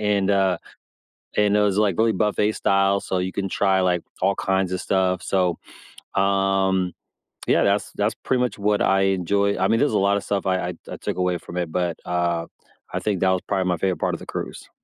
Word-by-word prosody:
And, 100 -2 +1
uh, 95 -2 +2 0.8
and 105 -1 +3
it - - +3
was, 100 -2 +2
like, 100 -5 +2
really 115 0 +3
buffet 105 +1 +1
style, 100 -1 +2
so, 95 - -2
you 90 +1 -1
can 95 -1 -2
try, 95 0 +2
like, 90 -2 +1 0.2
all 100 +1 +3
kinds 95 -1 0
of 90 - -2
stuff. 95 -2 0
So, 90 -1 0 0.6
um, 95 -2 +1 0.6
yeah, - - +4
that's 100 +1 +1
that's 105 +2 0
pretty 130 -1 +1
much 125 -4 -1
what 105 0 +1
I 95 0 +3 0.2
enjoy 100 +3 +1
I - - +2
mean, 115 - +3
there's 145 - +2
a - - +3
lotta 100 +1 +2
stuff 100 -1 -2
I 95 -1 +2
I 90 - -4 0.2
I - - -5
took - - -4
away 90 -1 +1
from 85 - -9
it, 85 -2 -2
but, 90 -1 -1
uh, 85 -1 0 0.5
I - - -1
think 105 -4 -1
that 95 - +4
was 95 - 0
probably 95 -2 0
my 90 - +1
favorite 95 +2 -1
part - - 0
of - - -8
the - - -10
cruise. - - -6
95 Hz, 220 wpm, -23 LUFS, 90-100 Hz, 0.8 s, yeah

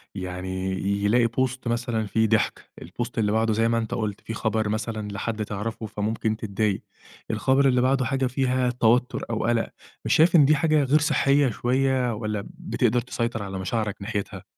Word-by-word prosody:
يعني، 95 0 -4
ي 100 +2 -1
يلاقي 115 +3 +4
بوست 130 +1 -2
مثلًا 120 -1 -1
فيه 110 +2 +2
ضحك، 110 0 0
البوست 120 +8 -6
اللي 105 -2 +2
بعده 110 0 +2
زي 115 +1 +2
ما 115 0 +1
أنت 110 -1 -2
قُلت، 105 -3 -3
في 115 - -6
خبر 110 -1 -1
مثلًا 110 0 -3
لحد 105 +1 -3
تعرفه، 110 +2 -4
فممكن 110 +1 -2
تضايق. 105 -2 -1 0.5
الخبر 135 +1 +3
اللي 125 -1 +3
بعده 130 0 +2
حاجة 135 +2 0
فيها 130 -1 +1
توتُّر 125 0 +2
أو 115 - -1
قلق. 115 -1 +1 0.4
مش - - +2
شايف 165 +2 +5
إن 145 -4 +7
دي 155 - +5
حاجة 155 0 +2
غير 145 +3 +3
صحية 140 -2 +3
شوية، 130 +1 +1
والّا 105 -2 -3
بتقدر 130 - 0
تسيطر 115 -3 -3
على 95 -1 -5
مشاعرك 105 +2 -2
ناحيتها؟ 100 -2 -4
115 Hz, 175 wpm, -25 LUFS, 105-125 Hz, 0.5 s, إن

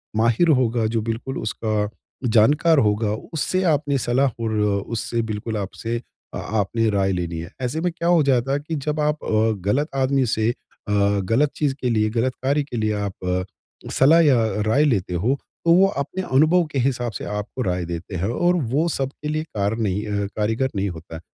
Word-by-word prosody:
माहिर 115 +9 +3
होगा, 115 -2 +1
जो 115 0 -1
बिल्कुल 115 +4 -4
उसका 110 -1 -1 0.4
जानकार 145 +9 +4
होगा, 105 -2 +1 0.2
उससे 185 +4 0
आपने 145 -2 +1
सलाह 130 +3 +2
और 110 - -1 0.4
उससे 115 0 -2
बिल्कुल 110 0 -4
आपसे 115 +4 -4 0.3
आपने 110 +2 0
राय 95 -2 +1
लेनी 85 -2 -3
हैं। 85 +1 -7
ऐसे 130 +6 -2
में 180 +1 0
क्या 170 0 -3
हो 175 -2 +5
जाता 135 -1 +2
है 140 - +1
कि 155 +3 -5
जब 150 +1 -2
आप 150 0 0
अ, - - -6 0.4
गलत 145 +9 +2
आदमी 135 0 +2
से 110 +1 +1
अ, 105 -3 -8 0.3
गलत 130 +9 +2
चीज़ 145 -3 0
के 125 - 0
लिए, 110 -2 +2
गलत 120 +3 0
कार्य 140 +2 +2
के 130 -4 -6
लिए 110 -1 0
आप 90 -2 -2 0.5
सलाह 160 +5 +5
या 145 -5 +5 0.3
राय 135 +7 +4
लेते 100 -10 0
हो 115 +11 +1 0.3
तो 165 - +5
वो 190 +2 +6
अपने 185 +3 -3
अनुभव 155 +5 +4
के 135 - -1
हिसाब 120 -2 0
से - - -5
आपको 105 +5 -4
राय 90 -4 -1
देते 85 +3 -6
हैं। 95 +5 -1
और 175 +9 +2 0.2
वो 155 +6 +2
सबके 140 0 -3
लिए 155 0 -1
कार 105 -7 -2
नहीं 105 -2 -1
अ, 100 -1 -1
कारीगर 110 +5 0
नहीं 100 0 0
होता। 80 -1 -8
120 Hz, 190 wpm, -22 LUFS, 105-145 Hz, 0.5 s, वो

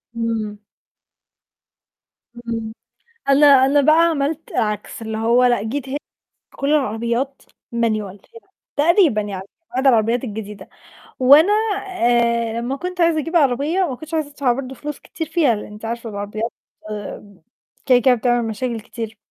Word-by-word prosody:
إمم. 225 -2 -2 1.8
إمم. 230 -2 -5 0.6
أنا 285 +2 +6
أنا 275 +1 +6
بقى 310 +2 +5 0.2
عملت 300 +1 -2
عكس، 210 +1 -2
اللي 220 0 -4
هو 235 +3 +3
لأ 240 -4 +3
جيت 265 +4 -4
ه 275 - -3 0.6
كل 275 - -2
العربيات 240 +1 -1 0.3
Manual 215 -4 -1
هنا 460 - -15 0.3
تقريبًا 310 - +4
يعني 195 -2 -5 0.3
بعض 260 +2 0
العربيات 235 0 +3
الجديدة 210 -3 -7 0.5
وأنا 290 +9 +6 0.4
آآ، 235 -7 +1
لمّا 260 +3 -3
كنت 360 +3 -5
عايزة 335 -2 +3
أجيب 330 +3 -2
عربية 290 +4 +2
ما 265 - -3
كنتش 315 +3 -9
عايزة 310 -2 -1
أدفع 280 -3 +1
برضه 260 +1 -5
فلوس 295 +2 -6
كتير 320 - -6
فيها، 305 -7 +2
لإن 210 0 -8
أنتِ 210 +2 -11
عارفة 230 0 -4
العربيات 210 +3 -4 1.3
كده 255 -2 +6
كده 255 - +6
بتعمل 240 -1 0
مشاكل 230 +1 -3
كتير. 225 -1 -7
240 Hz, 140 wpm, -20 LUFS, 225-285 Hz, 1.8 s, أنا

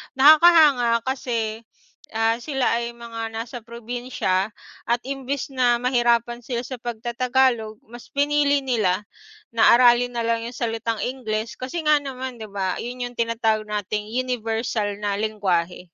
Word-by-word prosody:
Nakakahanga 290 -6 +6
kasi 230 -4 -2 0.5
ah, 225 +1 +2
sila 265 -5 0
ay 235 - -3
mga 230 -1 -6
nasa 230 +2 -5
probinsya. 235 -4 -2 0.4
At 235 - +3
imbes 275 0 -4
na 245 -2 +3
mahirapan 240 -1 +1
sila 240 -2 -2
sa 255 0 -6
pagta-tagalog 240 -1 0
mas 240 0 -11
pinili 285 0 +2
nila 210 -6 +1 0.5
na 230 0 +5
aralin 245 0 +5
nalang 230 -1 -1
yung 240 - -6
salitang 225 -2 -2
Ingles 230 -3 -3
kasi 305 +7 -4
nga 300 -1 +4
naman 260 -3 -6
di 220 - -7
ba 195 -3 -3
yun 250 +1 -6
yung 245 0 -5
tinatawag 225 -2 0
nating 210 0 -3
universal 225 -4 -1
na 200 -1 -1
lengwahe. 190 -6 -1
235 Hz, 135 wpm, -23 LUFS, 220-255 Hz, 0.5 s, Nakakahanga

